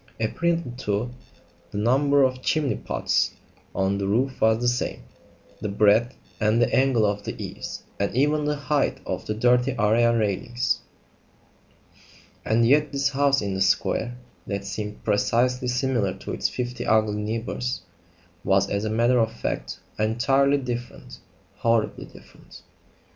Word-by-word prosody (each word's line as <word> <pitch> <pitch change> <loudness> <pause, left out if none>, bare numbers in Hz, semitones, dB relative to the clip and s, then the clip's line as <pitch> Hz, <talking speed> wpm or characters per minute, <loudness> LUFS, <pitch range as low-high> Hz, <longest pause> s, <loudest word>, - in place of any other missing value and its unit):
Apparently, 165 +6 0
too, 110 0 -2 0.6
the 100 - -6
number 140 +6 +3
of 130 -1 0
chimney 150 0 +1
pots - - 0 0.4
on 95 +1 0
the 100 - -1
roof 125 +6 0
was 110 0 +4
the 120 - 0
same; 120 - -1 0.6
the 105 - -3
breadth 105 +5 +3 0.2
and 110 +2 +3
angle 130 -4 +3
of 105 0 -1
the - - -6
eaves; - - -6 0.2
and 100 - 0
even 150 +3 +2
the 150 0 0
height 145 0 0
of - - -4
the 105 - -1
dirty 125 +3 +2
area 115 +2 +3
railings. 115 +3 0 1.6
And 115 +1 +2
yet 150 +2 +3
this 140 -1 +1
house 140 -2 +2
in 100 -1 -2
the 95 - -2
square, 120 +5 +1 0.3
that 100 -3 -3
seemed 105 +1 -5
precisely 125 +4 +1
similar 125 -6 0
to 95 - -7
its - - 0
fifty 125 -1 -4
ugly 110 -1 +2
neighbours, 115 +3 -3 0.6
was 100 0 +2
as 100 +1 -1
a - - -1
matter 120 +3 +3
of 115 -1 +2
fact - - -4 0.2
entirely 135 +6 +2
different 120 - -6 0.4
horribly 115 -1 0
different. - - -16
120 Hz, 145 wpm, -24 LUFS, 105-130 Hz, 1.6 s, was